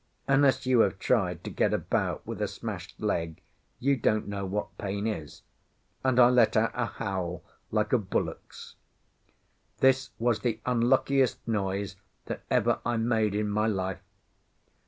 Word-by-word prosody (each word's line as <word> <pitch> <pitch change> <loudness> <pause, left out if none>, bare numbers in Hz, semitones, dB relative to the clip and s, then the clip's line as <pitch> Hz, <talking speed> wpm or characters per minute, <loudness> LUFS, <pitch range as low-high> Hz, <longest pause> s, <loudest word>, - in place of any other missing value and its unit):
Unless 135 -1 +3
you 130 -2 +4
have 95 -3 +3
tried 90 -5 0
to - - -5
get - - +1
about - - -1
with - - -5
a - - +1
smashed - - -7
leg 80 -1 -2 0.4
you 140 +2 +2
don't 110 -3 +1
know 100 -1 -3
what 105 +2 -3
pain 100 +1 -3
is, 80 -10 -4 0.6
and 130 -1 +2
I 120 - +9
let 115 -3 +4
out 110 +1 +3
a 120 -1 -1
howl 90 -5 -4 0.3
like 105 +1 0
a 125 - +5
bullock's. 100 - -4 1.0
This 130 0 +3
was 115 0 +1
the 115 -3 -1
unluckiest 125 +2 +2
noise 100 -3 -2 0.3
that - - -5
ever - - +2
I 120 -1 0
made 110 -3 +1
in 105 0 0
my 105 +1 +1
life. 95 -3 -2
110 Hz, 155 wpm, -28 LUFS, 100-125 Hz, 1.0 s, I